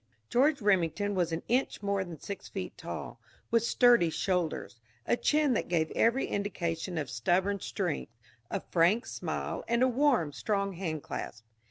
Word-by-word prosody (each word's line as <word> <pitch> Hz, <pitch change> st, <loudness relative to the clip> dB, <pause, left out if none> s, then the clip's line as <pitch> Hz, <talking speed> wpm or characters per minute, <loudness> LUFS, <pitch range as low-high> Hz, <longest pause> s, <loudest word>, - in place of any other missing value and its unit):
George 275 Hz, 0 st, +3 dB
Remington 205 Hz, 0 st, +2 dB
was 175 Hz, -3 st, 0 dB
an 165 Hz, -, -3 dB
inch 250 Hz, -3 st, 0 dB
more 200 Hz, -1 st, +1 dB
than 170 Hz, -4 st, -9 dB
six 200 Hz, -, -7 dB
feet -, -, -5 dB
tall, -, -, -7 dB, 0.3 s
with 230 Hz, 0 st, +4 dB
sturdy 235 Hz, -7 st, +5 dB
shoulders, 170 Hz, -8 st, -2 dB, 0.3 s
a -, -, +3 dB
chin 295 Hz, +1 st, +2 dB
that -, -, -1 dB
gave 160 Hz, -2 st, +1 dB
every 235 Hz, +4 st, +2 dB
indication 175 Hz, -3 st, -2 dB
of 150 Hz, -3 st, -2 dB
stubborn 175 Hz, -, +1 dB
strength, 180 Hz, -, -3 dB, 0.4 s
a 195 Hz, -, -2 dB
frank 180 Hz, +8 st, +3 dB
smile, -, -, -4 dB
and 235 Hz, +1 st, +2 dB
a -, -, +5 dB
warm, 250 Hz, -, +2 dB
strong 200 Hz, +4 st, -1 dB
handclasp. 155 Hz, -, -5 dB
195 Hz, 155 wpm, -30 LUFS, 165-235 Hz, 0.4 s, sturdy